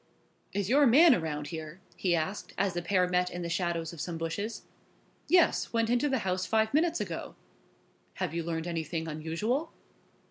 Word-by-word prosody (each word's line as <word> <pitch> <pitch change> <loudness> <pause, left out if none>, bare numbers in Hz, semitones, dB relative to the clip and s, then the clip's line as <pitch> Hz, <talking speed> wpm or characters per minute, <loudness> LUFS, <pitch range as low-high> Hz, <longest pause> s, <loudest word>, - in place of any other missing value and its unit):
"Is 200 -2 -1
your 280 +5 +5
man 300 +6 +7
around 150 -6 -2
here?" 160 +1 -7 0.2
he 180 -3 +1
asked, 170 +5 -3
as 195 -2 +1
the 175 - -2
pair 180 +1 +2
met 180 0 +1
in 175 0 -5
the 170 - -3
shadow 170 -1 0
of 165 - -7
some 170 -2 -4
bushes. 185 +7 -4 0.6
"Yes, 355 -2 +3
went 230 0 +1
into 245 +4 +2
the 265 - +1
house 185 0 -1
five 220 +1 +1
minutes 330 +3 +2
ago." - - -5 0.8
"Have - - -3
you 170 - -1
learned 165 0 -3
anything 165 -1 -3
unusual?" 165 - -2
180 Hz, 175 wpm, -30 LUFS, 165-230 Hz, 0.8 s, man